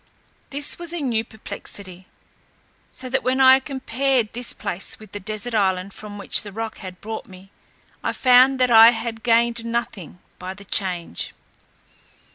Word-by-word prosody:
This 290 +3 -2
was 345 -1 -5
a 345 - -3
new 240 -6 0
perplexity: 195 -4 -8 0.8
so 260 - -6
that 255 - 0
when 255 +1 0
I 265 0 +8
compared 265 -3 -1
this 245 +1 -1
place 185 +3 -4
with 215 -2 -15
the 205 - -6
desert 215 +4 -4
island 195 -2 0
from 210 -1 -9
which 200 - +2
the 205 - -9
roc 225 +2 -5
had 185 -3 -9
brought 220 +1 -6
me, 190 +1 -15 0.5
I - - 0
found 255 +1 +5
that 250 -1 +3
I 225 0 +10
had 225 0 -5
gained 235 0 +2
nothing 230 -7 -4 0.2
by 185 +1 -6
the 200 0 -13
change. 180 - -1
225 Hz, 160 wpm, -22 LUFS, 200-250 Hz, 0.8 s, I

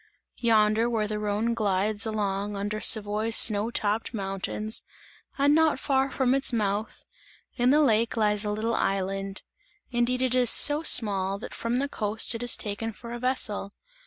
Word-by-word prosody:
Yonder, 220 0 +2
where 220 -3 -1
the 210 0 -4
Rhone 210 +3 -1
glides 210 0 -1
along 205 -1 -3
under 205 +2 -4
Savoy's 215 +1 +2
snow 215 0 +4
topped 220 +1 -2
mountains 200 +2 -2 0.6
and 285 +1 +3
not 315 -3 +2
far 270 -1 0
from 260 -2 0
its 275 0 +1
mouth, 210 -1 -3 0.5
in 245 0 +1
the 295 +3 +4
lake 230 -3 +1
lies 210 -1 +1
a 210 - -2
little 215 +2 -2
island, 195 -1 -3 0.5
indeed 250 +1 0
it 255 -1 0
is 250 -2 +3
so 295 +5 +5
small, 195 -9 +3
that 200 - -9
from 230 +1 -3
the 275 +3 0
coast 220 -4 0
it 230 - -6
is 245 -1 +3
taken 215 +2 -5
for 235 +2 -10
a 240 - -6
vessel. 220 -5 -2
220 Hz, 165 wpm, -26 LUFS, 205-240 Hz, 0.6 s, so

